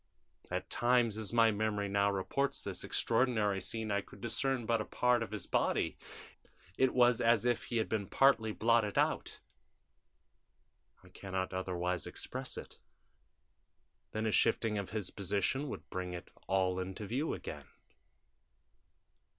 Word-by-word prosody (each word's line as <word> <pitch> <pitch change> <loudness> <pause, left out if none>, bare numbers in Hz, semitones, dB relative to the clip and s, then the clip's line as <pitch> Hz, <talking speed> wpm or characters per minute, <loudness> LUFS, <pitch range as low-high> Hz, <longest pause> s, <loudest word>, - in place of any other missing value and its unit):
At - - -3
times, 120 -3 +2
as 110 -2 -2
my 115 -1 +5
memory 105 -1 -1
now 100 0 +2
reports 140 +8 -1
this 95 -3 -4
extraordinary 110 -5 +1
scene, 110 +2 -3
I 100 0 +1
could - - -15
discern 120 +1 0
but 115 -1 +1
a - - -4
part 125 -1 +2
of 115 - -3
his 105 -3 -5
body; - - +1 0.8
it 130 -1 +2
was 120 -2 +5
as 115 -1 +4
if 120 -2 +1
he 120 - -2
had 110 - +1
been 105 -3 -2
partly 120 -4 +4
blotted 115 -1 +2
out - - +1 1.7
I - - -16
can 95 -1 -10
not 95 0 -1
otherwise 90 -2 -2
express - - -4
it - - -9 1.3
then 110 +1 -2
a 110 - +1
shifting 105 0 +2
of 100 - -5
his 105 -3 -3
position 100 +9 -1
would - - -7
bring 90 -1 -3
it 85 - -8 0.2
all 95 -1 +1
into 95 +3 -5
view 135 +9 -1
again. - - -7
110 Hz, 150 wpm, -33 LUFS, 95-120 Hz, 1.7 s, my